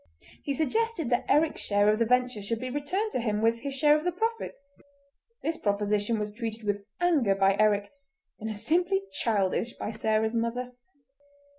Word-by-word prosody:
He 280 - -2
suggested 335 - 0
that 245 - +2
Eric's 300 +2 +3
share 205 0 +2
of 215 +1 +3
the 230 - +2
venture 250 -2 +1
should 220 +3 -2
be 255 +1 -4
returned 360 - -2
to - - -1
him 215 -3 -1
with 230 +1 +2
his 275 +2 -5
share 295 +1 +5
of 305 - -1
the 360 - +1
profits. 415 -7 -4 0.7
This 325 0 -1
proposition 205 +1 0
was 210 -1 -3
treated 225 0 -5
with 205 -1 -1 0.2
anger 300 - +3
by 195 0 +3
Eric, 205 -1 +2 0.5
and 220 0 -4
as 210 -1 -5
simply 360 +4 +2
childish 225 -3 0
by - - -4
Sarah's 220 0 0
mother. 235 +2 -2
235 Hz, 175 wpm, -28 LUFS, 210-300 Hz, 0.7 s, share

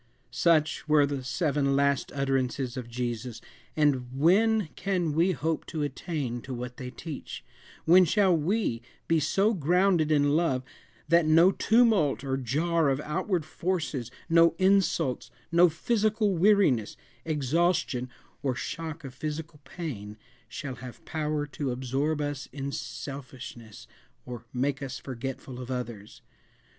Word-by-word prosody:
Such 155 +4 +2
were 150 -1 +5
the 140 -2 -3
seven 140 0 0
"last 140 -1 +1
utterances" 135 -2 -1
of 125 -2 -6
Jesus 120 -1 -4 0.4
and 135 -5 +2
when 205 +4 +4
can 180 -5 -1
we 170 +5 +3
hope 160 +2 -2
to 155 -2 -3
attain 140 -4 -3
to 130 +1 -6
what 125 +1 -6
they 125 - -6
teach? 150 +2 -8 0.4
When 180 +2 +7
shall 190 +1 +3
we 165 - 0 0.3
be 165 -1 +3
so 195 +8 +2
grounded 175 -1 +2
in 145 -1 +3
Love 155 -6 +1 0.4
that 170 0 +4
no 165 +4 +6
tumult 220 - +3
or 135 -1 -1
jar 150 +5 +1
of 135 0 0
outward 170 +2 -1
forces, 160 -11 -2 0.2
no 165 -1 +5
insults, 185 -10 +2 0.2
no 170 +1 +6
physical 210 +3 +1
weariness, 175 - +3 0.3
exhaustion, 150 -3 0 0.3
or 130 -2 -1
shock 160 +3 -5
of 135 -3 -8
physical 155 +3 -5
pain, 115 - -6 0.3
shall 130 +3 -6
have 125 0 -10
power 150 -1 -2
to 145 -1 -4
absorb 135 +5 -1
us 145 -1 -3
in 140 -1 -4
selfishness, 125 -3 -8 0.4
or 120 -2 -8
make 135 +2 -1
us 135 -2 -5
forgetful 130 0 -6
of 125 0 -7
others? 120 -5 -6
145 Hz, 135 wpm, -28 LUFS, 130-170 Hz, 0.4 s, When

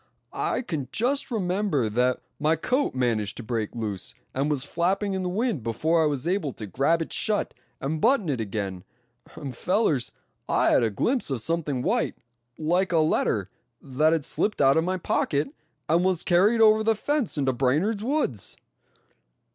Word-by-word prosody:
"I 260 - -1
can 155 - -3
just 270 +5 0
remember 185 - 0
that 125 +4 +1 0.2
my 155 +2 +3
coat 255 - 0
managed 115 -4 0
to 120 - -5
break 110 -1 -3
loose, 105 -5 -4 0.2
and 140 +3 0
was 145 -3 0
flapping 190 +6 0
in 190 - -1
the 180 - -2
wind 215 - -1
before 155 +9 +1
I 155 - +3
was 145 0 -2
able 175 -7 0
to 110 - -7
grab 140 - +1
it - - -9
shut, 210 -1 0 0.3
and 155 +3 -3
button 235 -6 +3
it 130 -6 -1
again. 100 -3 -4 0.5
And 135 -5 -6
fellers, 170 - +1 0.4
I - - +3
had - - +5
a 115 - +2
glimpse 240 - 0
of 135 -3 -1
something 150 -4 -1
white, - - 0 0.4
like 175 +5 +1
a 170 - +3
letter, 110 - +1 0.3
that 150 +3 +1
had 160 -4 0
slipped 210 - -1
out 135 -1 +5
of 160 - +3
my 185 +2 -1
pocket, 145 -4 0 0.3
and 170 +3 +3
was 185 -2 +1
carried 205 +6 +4
over 215 0 +6
the 225 0 +3
fence 285 - -1
into 135 -2 +1
Brainard's 155 - +1
woods!" 240 - -1
155 Hz, 175 wpm, -26 LUFS, 130-195 Hz, 0.5 s, over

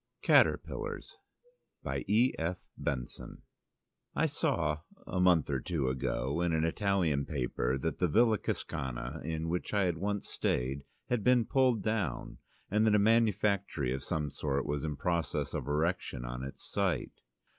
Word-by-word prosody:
Caterpillars - - +2 0.7
I - - -1 2.2
saw 75 -2 0 0.3
a 90 - -2
month 90 -5 +4
or 70 - +1
two 70 -2 -1
ago 65 +3 -1
in 85 -1 +1
an 80 0 +2
Italian 85 -5 +1
paper 65 -2 -1
that 80 +5 -3
the 90 - +3
Villa 110 +4 +4
Cascana, 65 +3 -4
in 80 0 -3
which 90 +5 -2
I 100 -2 +3
once 100 +4 -3
stayed, 70 +3 -1 0.2
had 125 -4 0
been 125 -2 +4
pulled 125 -5 +2
down, 105 - -2 0.3
and 110 +2 +3
that 105 - +5
a 105 +1 +4
manufactory 100 - +1
of 65 +1 -4
some 75 -3 -2
sort 70 -2 -1
was 75 -1 -2
in 75 -2 -2
process 85 0 -1
of - - -3
erection 75 -4 -1
on 60 +1 -5
its 65 - -7
site. 95 -9 -1
80 Hz, 135 wpm, -32 LUFS, 70-100 Hz, 2.2 s, that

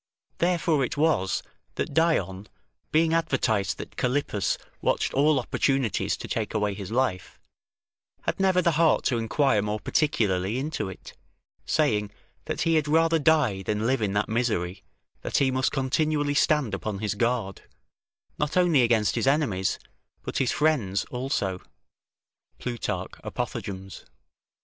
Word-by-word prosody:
Therefore 170 -4 +2
it 130 - -3
was, 145 - +1 0.3
that - - -3
Dion, 105 - +1 0.4
being 160 +1 +3
advertised 110 - +1
that - - -9
Callippus 125 -6 0 0.2
watched - - 0
all 145 +1 +3
opportunities 135 -1 0
to - - -7
take - - -3
away 105 -1 +1
his 100 -2 -7
life, 115 -6 -1 0.8
had - - -2
never 190 -1 +3
the 170 - +3
heart 160 -2 +4
to 120 - +1
inquire 115 0 +2
more 105 +1 -2
particularly 105 - 0
into 145 -6 -3
it, 95 - -11 0.5
saying, 110 -10 +1 0.4
that - - -3
he 165 +1 +2
had 150 -1 0
rather 165 +2 +3
die 145 -11 +3
than 105 +3 -2
live 130 0 +1
in 100 -2 0
that 105 +1 +1
misery, 105 -5 -1 0.4
that - - -1
he 135 -1 +3
must 130 0 +1
continually 145 +2 0
stand 145 -6 +2
upon 100 +2 -3
his 105 0 -2
guard, 115 -3 -1 0.8
not 150 +3 -1
only 175 -6 +4
against 115 -3 +3
his - - -1
enemies, 135 -10 +1 0.5
but - - -3
his 130 - +2
friends 130 -12 +1
also; 125 -8 -2 1.0
[Plutarch, 120 -2 -3
Apothegms. 95 -1 -5
125 Hz, 140 wpm, -26 LUFS, 105-150 Hz, 1.0 s, heart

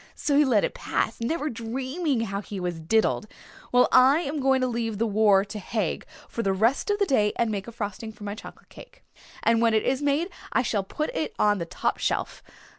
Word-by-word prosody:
So 285 - 0
he 295 - +6
let 235 -8 +3
it - - -1
pass, 225 - -2
never 300 +6 -1
dreaming 260 +4 -2
how 200 -3 -3
he 205 -1 -7
was 175 -2 -3
diddled. 215 +5 +1 0.4
Well, 245 0 +5
I 265 +5 +6
am 295 -1 -3
going 265 -1 +3
to 255 - +2
leave 230 -3 -2
the 230 - +1
war 205 -2 +4
to 210 +1 -7
Haig 205 -3 -3 0.2
for 230 - -4
the 195 -3 +1
rest 230 - +1
of 410 - +2
the 405 - +2
day 210 - +2
and 230 -2 0
make 200 0 -4
a - - -7
frosting 220 -1 -5
for 215 - -14
my 205 0 -4
chocolate 215 - -12
cake. - - -15 0.4
And 230 0 +3
when 230 -1 +3
it 215 - +2
is 265 +1 0
made 290 +5 +1 0.2
I 260 - +2
shall 210 -5 0
put 305 +10 -3
it 315 - -2
on 205 -1 +3
the 170 - -4
top - - -2
shelf. - - -2
230 Hz, 225 wpm, -26 LUFS, 210-270 Hz, 0.4 s, he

